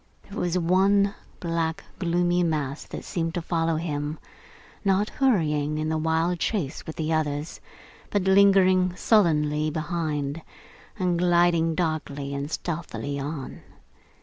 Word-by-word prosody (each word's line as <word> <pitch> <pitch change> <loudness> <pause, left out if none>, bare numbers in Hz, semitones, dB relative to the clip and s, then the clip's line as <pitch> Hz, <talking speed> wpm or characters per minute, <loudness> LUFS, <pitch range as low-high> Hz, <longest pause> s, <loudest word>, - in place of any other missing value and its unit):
There - - -7
was 180 0 0
one 195 +3 +3 0.3
black, 165 -1 -2 0.2
gloomy 175 0 +1
mass 150 -4 -1
that - - -7
seemed 165 0 -2
to 175 - -1
follow 165 -1 0
him: 150 -1 -3 0.7
not 200 +1 +2
hurrying 155 - +1
in 155 0 -1
the 160 - 0
wild 160 +2 +1
chase 170 -11 -2
with 160 - -6
the 160 0 -1
others, 150 0 -2 0.5
but 205 -2 0
lingering 190 -2 +5
sullenly 155 -8 +2
behind, 155 -2 -2 0.6
and 180 -3 0
gliding 170 -2 +3
darkly 150 -4 -2
and 140 +1 -3
stealthily 155 -4 -4
on. 140 -1 -5
165 Hz, 125 wpm, -25 LUFS, 155-180 Hz, 0.7 s, lingering